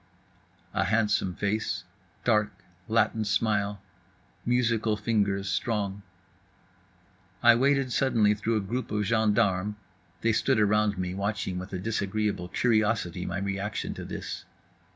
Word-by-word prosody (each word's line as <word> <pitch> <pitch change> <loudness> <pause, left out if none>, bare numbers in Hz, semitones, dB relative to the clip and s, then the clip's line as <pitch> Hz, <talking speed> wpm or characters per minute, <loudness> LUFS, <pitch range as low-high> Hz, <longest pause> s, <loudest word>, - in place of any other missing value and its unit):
A - - +1
handsome 105 -4 +1
face, 100 -1 -1 0.4
dark, 105 -3 +1 0.2
Latin 110 0 +2
smile, 105 -1 0 0.6
musical 115 -3 +2
fingers 100 -2 0
strong. 100 0 -1 1.4
I 120 0 +9
waded 135 +1 +2
suddenly 115 -6 +3
through 110 +2 0
a - - 0
group 120 +7 -3
of 105 -1 0
gendarmes 105 -2 +2 0.5
(they 115 0 +2
stood 125 +2 +2
around 105 -1 +2
me 90 -1 -2
watching 100 -1 -2
with 90 +2 -8
a 95 - -3
disagreeable 105 -2 -1
curiosity 110 -5 +1
my - - -2
reaction 100 +1 -3
to - - -7
this). - - -6
105 Hz, 120 wpm, -28 LUFS, 100-115 Hz, 1.4 s, I